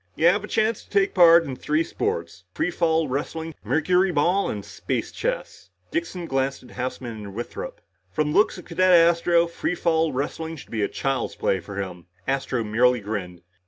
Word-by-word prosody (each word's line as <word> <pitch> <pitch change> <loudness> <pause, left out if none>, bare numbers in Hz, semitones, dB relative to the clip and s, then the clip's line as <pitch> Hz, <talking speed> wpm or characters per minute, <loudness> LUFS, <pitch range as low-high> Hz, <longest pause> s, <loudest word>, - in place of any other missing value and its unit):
"You 160 - +1
have 195 +4 +5
a - - -5
chance 220 0 0
to - - -25
take 200 -1 +2
part 170 -2 +7
in 135 -5 -5
three 155 +5 0
sports. 430 - -3
Free 320 - 0
fall 160 -2 +1
wrestling, 160 +4 -3
mercuryball 180 +2 +2
and - - -4
space - - -3
chess." - - -4 0.2
Dixon 320 - -3
glanced 135 -3 -1
at 125 - -15
Houseman 125 -1 -4
and 100 -1 -9
Withrop. 120 +2 -6 0.3
"From 150 +11 0
the - - +1
looks 210 - +2
of 180 - -10
Cadet 185 +2 +2
Astro, 170 0 +5
free 170 +1 -2
fall 160 -2 +1
wrestling 160 +4 -3
should 145 - -12
be 110 -3 0
child's 135 -3 -2
play 95 - 0
for 95 +3 -9
him!" 90 -3 -6 0.2
Astro 135 -3 0
merely 120 +3 +3
grinned. 95 -5 -5
160 Hz, 180 wpm, -24 LUFS, 125-175 Hz, 0.3 s, part